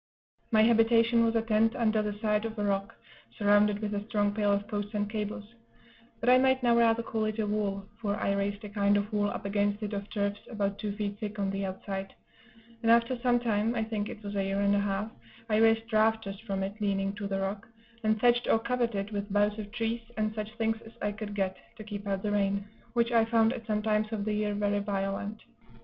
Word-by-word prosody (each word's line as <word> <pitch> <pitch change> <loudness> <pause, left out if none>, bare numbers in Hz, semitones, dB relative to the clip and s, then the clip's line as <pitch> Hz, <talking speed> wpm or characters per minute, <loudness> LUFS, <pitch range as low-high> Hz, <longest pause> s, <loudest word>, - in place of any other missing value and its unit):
My 220 -2 +5
habitation 230 +1 +4
was 230 0 +1
a 225 - +2
tent 225 +1 +2
under 220 -3 +2
the 210 -1 -3
side 210 0 +1
of 225 0 -5
a 210 - -1
rock, 195 -1 -1 0.4
surrounded 205 -1 +4
with 210 0 -2
a 205 0 -2
strong 205 -2 +1
pale 205 -1 +1
of 200 0 0
posts 205 -1 -4
and 205 0 0
cables; 210 +1 -5 0.7
but 230 - -4
I 250 +1 +7
might 260 0 +3
now 240 -1 +4
rather 230 0 +4
call 220 -1 -1
it 215 0 -2
a 220 - 0
wall, 205 -2 -1
for 205 -2 -1
I 200 - 0
raised 200 +1 -2
a 210 - -6
kind 205 0 +2
of 205 +2 -2
wall 205 -1 +2
up - - -6
against 205 +1 0
it 210 0 -3
of 200 0 -4
turfs, 200 -1 -1
about 200 -3 -2
two 210 -2 -3
feet 205 -1 -3
thick, 215 0 -5
on 195 -1 0
the 195 0 -2
outside; 195 0 -5 0.7
and 230 - +1
after 235 +2 +4
some 245 0 +3
time 225 0 0
(I 225 - +1
think 215 -2 -3
it 215 - -9
was 200 0 -5
a 195 - +1
year 195 +1 -1
and 200 0 +3
a - - +3
half) 200 +2 -1 0.4
I 215 -2 +2
raised 225 +1 +3
rafters 215 -2 +2
from 195 -3 -3
it, 200 +3 -5
leaning 195 -1 0
to 205 -1 -3
the 195 -1 -2
rock, 195 +3 -3 0.4
and 215 0 +2
thatched 240 +1 +3
or - - +5
covered 235 0 -1
it 200 +2 -3
with 205 0 -4
boughs 205 +1 +2
of 205 -1 -6
trees, 230 0 -2 0.2
and 215 0 0
such 215 0 -5
things 225 0 0
as 225 - -13
I 205 - -1
could 205 -1 -6
get, 190 -2 -1 0.2
to 220 - -9
keep 205 -1 -7
out 195 -1 -1
the 210 - 0
rain; 200 -1 +1 0.3
which 235 0 +2
I 230 -1 +5
found 225 0 +3
at 235 -3 -8
some 210 -1 0
times 215 0 +1
of 210 -2 -2
the 215 - 0
year 210 -1 0
very 205 0 +1
violent. 200 +1 -3
210 Hz, 235 wpm, -29 LUFS, 200-225 Hz, 0.7 s, I